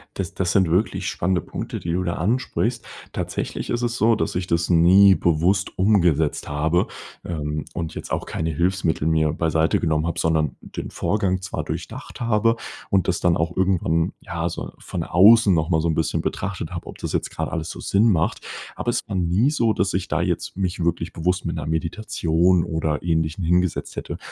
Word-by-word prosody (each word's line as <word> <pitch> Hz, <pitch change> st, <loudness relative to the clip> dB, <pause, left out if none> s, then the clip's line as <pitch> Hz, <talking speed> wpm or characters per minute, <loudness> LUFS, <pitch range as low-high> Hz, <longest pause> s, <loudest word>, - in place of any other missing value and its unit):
Das 95 Hz, -4 st, -4 dB
das 90 Hz, -3 st, 0 dB
sind 95 Hz, -4 st, +3 dB
wirklich 95 Hz, +1 st, 0 dB
spannende 90 Hz, +1 st, 0 dB
Punkte -, -, -6 dB
die 85 Hz, -, -3 dB
du 90 Hz, +2 st, 0 dB
da 85 Hz, -1 st, -1 dB
ansprichst. 115 Hz, +10 st, -1 dB, 0.3 s
Tatsächlich -, -, -4 dB
ist 120 Hz, 0 st, -1 dB
es 120 Hz, 0 st, -1 dB
so, 115 Hz, +1 st, +4 dB
dass 110 Hz, -, -2 dB
ich 90 Hz, -, -1 dB
das 85 Hz, 0 st, 0 dB
nie 95 Hz, +4 st, +7 dB
bewusst 85 Hz, +4 st, +1 dB
umgesetzt 90 Hz, -7 st, +2 dB
habe, 80 Hz, +4 st, +1 dB, 0.4 s
ähm, 75 Hz, -3 st, -3 dB
und 80 Hz, -1 st, -4 dB
jetzt -, -, -7 dB
auch -, -, -1 dB
keine 80 Hz, 0 st, -2 dB
Hilfsmittel 85 Hz, -1 st, 0 dB
mIr 80 Hz, -1 st, +2 dB
beiseite 80 Hz, 0 st, +1 dB
genommen 80 Hz, -1 st, 0 dB
habe 85 Hz, 0 st, -2 dB
sondern 80 Hz, -3 st, +1 dB
den -, -, -7 dB
Vorgang 95 Hz, -3 st, 0 dB
zwar 95 Hz, -, -4 dB
durchdacht -, -, -7 dB
habe 115 Hz, 0 st, +2 dB, 0.3 s
und 95 Hz, -3 st, +2 dB
das 90 Hz, -, +1 dB
dann 85 Hz, -1 st, +3 dB
auch 80 Hz, +2 st, -1 dB
irgendwann, 90 Hz, -3 st, +1 dB
ja, 85 Hz, 0 st, -3 dB
so -, -, -6 dB
von -, -, -5 dB
außen 105 Hz, +4 st, +6 dB
noch 80 Hz, -2 st, +1 dB
mal 80 Hz, -3 st, +2 dB
so 85 Hz, -, 0 dB
'n 80 Hz, -, +1 dB
bisschen 80 Hz, -, 0 dB
betrachtet -, -, -3 dB
habe, -, -, -6 dB
ob -, -, -9 dB
das -, -, -4 dB
jetzt -, -, -1 dB
grad -, -, -3 dB
alles 80 Hz, 0 st, -3 dB
so -, -, -7 dB
Sinn 105 Hz, +4 st, +3 dB
macht. 85 Hz, -3 st, +1 dB, 0.4 s
Aber -, -, -1 dB
es -, -, 0 dB
war 100 Hz, -, -3 dB
nie 90 Hz, +9 st, +2 dB
so, 115 Hz, -7 st, +2 dB
dass 95 Hz, -1 st, 0 dB
ich 95 Hz, -1 st, -1 dB
da -, -, 0 dB
jetzt -, -, -2 dB
mich 90 Hz, -2 st, -2 dB
wirklich 85 Hz, 0 st, -1 dB
bewusst 90 Hz, +2 st, -1 dB
mit 85 Hz, 0 st, -3 dB
'ner 75 Hz, -2 st, -4 dB
Meditation 85 Hz, +1 st, +1 dB
oder 80 Hz, -2 st, -2 dB
Ähnlichem 80 Hz, 0 st, 0 dB
hingesetzt 90 Hz, +1 st, 0 dB
hätte, -, -, -5 dB
85 Hz, 195 wpm, -23 LUFS, 80-95 Hz, 0.4 s, nie